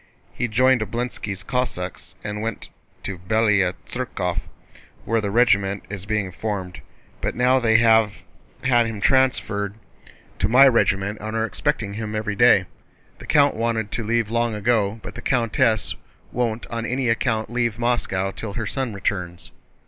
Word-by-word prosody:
"He 120 Hz, -, -1 dB
joined 130 Hz, +2 st, +3 dB
Obolénski's 110 Hz, -3 st, -4 dB
Cossacks 115 Hz, -8 st, -3 dB
and 105 Hz, 0 st, -4 dB
went 110 Hz, -1 st, -4 dB, 0.3 s
to 95 Hz, -2 st, -5 dB
Bélaya 100 Hz, -1 st, +2 dB
Tsérkov 100 Hz, -8 st, -3 dB, 0.7 s
where 115 Hz, 0 st, +1 dB
the 100 Hz, -, -2 dB
regiment 100 Hz, -3 st, +2 dB
is 100 Hz, -1 st, -6 dB
being 105 Hz, -3 st, -1 dB
formed. 95 Hz, -1 st, -4 dB, 0.4 s
But -, -, -2 dB
now 125 Hz, +2 st, +4 dB
they 110 Hz, -2 st, +4 dB
have 110 Hz, -2 st, +3 dB, 0.4 s
had 120 Hz, -3 st, +3 dB
him 110 Hz, -2 st, -5 dB
transferred 105 Hz, -5 st, +1 dB, 0.6 s
to -, -, +1 dB
my 130 Hz, +4 st, +8 dB
regiment 100 Hz, -3 st, +1 dB
and 110 Hz, +1 st, -4 dB
are 110 Hz, -, +1 dB
expecting 115 Hz, -4 st, -2 dB
him 110 Hz, 0 st, -4 dB
every 105 Hz, -1 st, -2 dB
day. -, -, +5 dB, 0.5 s
The -, -, -11 dB
count 145 Hz, -2 st, +4 dB
wanted 115 Hz, -2 st, -1 dB
to 115 Hz, -, -2 dB
leave 115 Hz, 0 st, 0 dB
long 115 Hz, -1 st, +1 dB
ago, 105 Hz, -1 st, +1 dB
but -, -, -7 dB
the -, -, -8 dB
countess 115 Hz, -3 st, +1 dB, 0.4 s
won't 115 Hz, -2 st, -1 dB
on 115 Hz, -1 st, -3 dB
any 125 Hz, 0 st, -1 dB
account 110 Hz, -1 st, 0 dB
leave 120 Hz, -3 st, 0 dB
Moscow 115 Hz, -5 st, 0 dB
till 100 Hz, +1 st, -6 dB
her 115 Hz, 0 st, -3 dB
son 125 Hz, -1 st, -3 dB
returns." 90 Hz, -3 st, -3 dB
110 Hz, 155 wpm, -23 LUFS, 100-120 Hz, 0.7 s, my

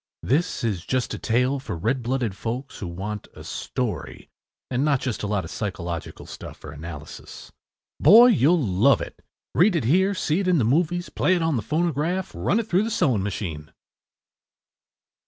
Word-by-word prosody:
” -, -, -68 dB
This 150 Hz, +2 st, 0 dB
is 100 Hz, -7 st, -1 dB
just 130 Hz, +2 st, -1 dB
a -, -, -5 dB
tale 125 Hz, +4 st, +1 dB
for 130 Hz, -, -5 dB
red 115 Hz, +9 st, 0 dB
blooded 120 Hz, -4 st, -1 dB
folks 120 Hz, +6 st, -5 dB
who 95 Hz, -, -4 dB
want 100 Hz, +4 st, -5 dB
a -, -, -10 dB
story -, -, -4 dB, 0.4 s
and 125 Hz, +2 st, +1 dB
not 145 Hz, -3 st, +2 dB
just 125 Hz, -4 st, -3 dB
a 105 Hz, -, -2 dB
lot 100 Hz, -2 st, -1 dB
of -, -, -9 dB
“psychological” 85 Hz, -5 st, -5 dB
stuff -, -, -10 dB
or 75 Hz, -, -8 dB
“analysis.” 75 Hz, 0 st, -9 dB, 0.5 s
Boy, 225 Hz, -, +8 dB
you’ll 175 Hz, -, +4 dB
love 105 Hz, +8 st, +4 dB
it! -, -, -8 dB, 0.3 s
Read 185 Hz, +2 st, +4 dB
it 160 Hz, -, +1 dB
here, 190 Hz, -, +3 dB
see 160 Hz, -1 st, 0 dB
it 195 Hz, -, -1 dB
in 180 Hz, -2 st, +4 dB
the 130 Hz, -, +2 dB
movies, 170 Hz, +8 st, +1 dB
play 185 Hz, -, +2 dB
it 170 Hz, -, 0 dB
on 160 Hz, -2 st, +1 dB
the 115 Hz, -, 0 dB
phonograph, 165 Hz, -, -1 dB
run -, -, 0 dB
it 230 Hz, -, -2 dB
through 185 Hz, -1 st, +3 dB
the 225 Hz, -, -2 dB
sewing 135 Hz, -, +1 dB
machine. 85 Hz, -6 st, -4 dB
130 Hz, 185 wpm, -24 LUFS, 105-170 Hz, 0.5 s, Boy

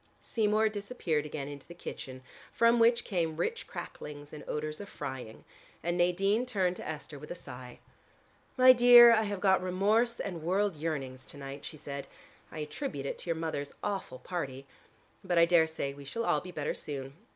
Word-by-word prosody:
Seymour 215 Hz, -1 st, +2 dB
disappeared 200 Hz, -8 st, -2 dB
again 145 Hz, -2 st, -5 dB
into 145 Hz, -1 st, -9 dB
the 175 Hz, -, -11 dB
kitchen 130 Hz, -6 st, -8 dB, 0.3 s
from 235 Hz, 0 st, +4 dB
which 235 Hz, +1 st, +5 dB
came 165 Hz, -5 st, -1 dB
rich 465 Hz, -, -2 dB
cracklings 145 Hz, 0 st, -8 dB
and 150 Hz, -, -8 dB
odors 155 Hz, +2 st, -3 dB
of 200 Hz, -, -9 dB
frying, 130 Hz, -6 st, -7 dB, 0.4 s
and 175 Hz, +1 st, 0 dB
Nadine 195 Hz, +7 st, +2 dB
turned 185 Hz, -6 st, +1 dB
to -, -, -7 dB
Esther 150 Hz, -2 st, -6 dB
with 150 Hz, -, -10 dB
a -, -, -4 dB
sigh. 125 Hz, -5 st, -10 dB, 0.8 s
"My 255 Hz, 0 st, +9 dB
dear, 240 Hz, -1 st, +9 dB
I 220 Hz, -, +4 dB
have 205 Hz, -2 st, -3 dB
got 190 Hz, -1 st, +4 dB
remorse 210 Hz, +6 st, +2 dB
and 175 Hz, -5 st, -4 dB
world 190 Hz, +3 st, +1 dB
yearnings 140 Hz, -5 st, -4 dB
to -, -, -13 dB
night," 140 Hz, 0 st, -8 dB
she 155 Hz, -, -8 dB
said. 140 Hz, -1 st, -6 dB, 0.4 s
"I -, -, -9 dB
attribute 150 Hz, -, -4 dB
it -, -, -4 dB
to -, -, -7 dB
your 165 Hz, -, 0 dB
mother's 155 Hz, -3 st, -4 dB
awful 200 Hz, -10 st, -3 dB
party. 135 Hz, -5 st, -5 dB, 0.6 s
But 180 Hz, -2 st, 0 dB
I 170 Hz, -, +7 dB
daresay 160 Hz, -4 st, +2 dB
we 140 Hz, 0 st, -11 dB
shall 230 Hz, +12 st, -3 dB
all -, -, +2 dB
be 180 Hz, -, -9 dB
better 150 Hz, -4 st, -2 dB
soon. 135 Hz, -2 st, -6 dB
170 Hz, 185 wpm, -31 LUFS, 145-205 Hz, 0.8 s, My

